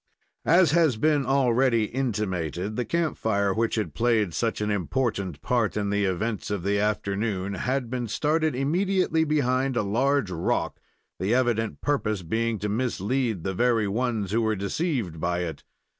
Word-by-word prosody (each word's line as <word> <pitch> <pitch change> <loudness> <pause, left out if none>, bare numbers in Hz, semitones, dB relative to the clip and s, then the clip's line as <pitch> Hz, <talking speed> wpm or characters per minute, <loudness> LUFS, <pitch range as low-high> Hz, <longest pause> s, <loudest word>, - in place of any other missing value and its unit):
As 170 -3 +5
has 160 -7 +3
been 145 0 +2
already 130 -3 +3
intimated, 105 - -2
the 125 - -1
camp 170 -2 -1
fire, 100 -3 +1
which 115 +2 0
had 110 -2 -2
played 115 -6 +1
such 70 - -1
an 105 0 -1
important 100 - -1
part 120 -4 +1
in 100 -1 -1
the 100 0 +1
events 100 +4 -2
of 100 -4 -2
the 100 +1 +1
afternoon 100 -1 -1
had 125 +6 -1
been 125 -2 -2
started 155 +5 0
immediately 170 +4 +1
behind 135 -3 +1
a 110 - +2
large 125 +2 +1
rock, 85 -1 -1 0.4
the 100 +6 +1
evident 115 -3 0
purpose 110 -9 -1
being 115 +6 -1
to 105 - -3
mislead 115 -2 -1
the 95 - -2
very 115 +1 +2
ones 110 -2 -1
who 115 +2 +2
were 110 -1 +1
deceived 100 - -2
by 85 +2 -1
it. 85 -2 -5
115 Hz, 160 wpm, -26 LUFS, 100-130 Hz, 0.4 s, As